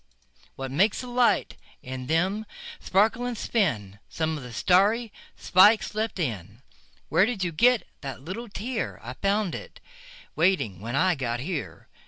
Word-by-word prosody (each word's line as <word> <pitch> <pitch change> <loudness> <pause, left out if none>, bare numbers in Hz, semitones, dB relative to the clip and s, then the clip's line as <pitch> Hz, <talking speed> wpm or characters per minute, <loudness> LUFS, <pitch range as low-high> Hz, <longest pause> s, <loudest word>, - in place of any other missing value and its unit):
What 135 -1 -5
makes 190 +9 +2
the - - -7
light 245 0 +1 0.3
in 130 0 -6
them 190 +7 0 0.3
sparkle 215 +5 +2
and 245 -2 -4
spin? 110 - -1
Some 160 -1 -2
of 150 - -6
the 125 -1 -9
starry 205 - +2 0.2
spikes 210 +5 +5
left 215 0 -2
in. 110 - -4 0.5
Where 180 +6 +4
did 225 -6 -2
you 175 - -1
get 240 +8 +3 0.2
that 135 -3 -6
little 190 - -7
tear?I 215 - -4
found 200 +4 0
it - - -8 0.6
waiting 160 - +1
when 115 +5 -5
I 185 +5 +3
got 120 -5 -3
here. 155 +3 -5
180 Hz, 150 wpm, -26 LUFS, 130-215 Hz, 0.6 s, spikes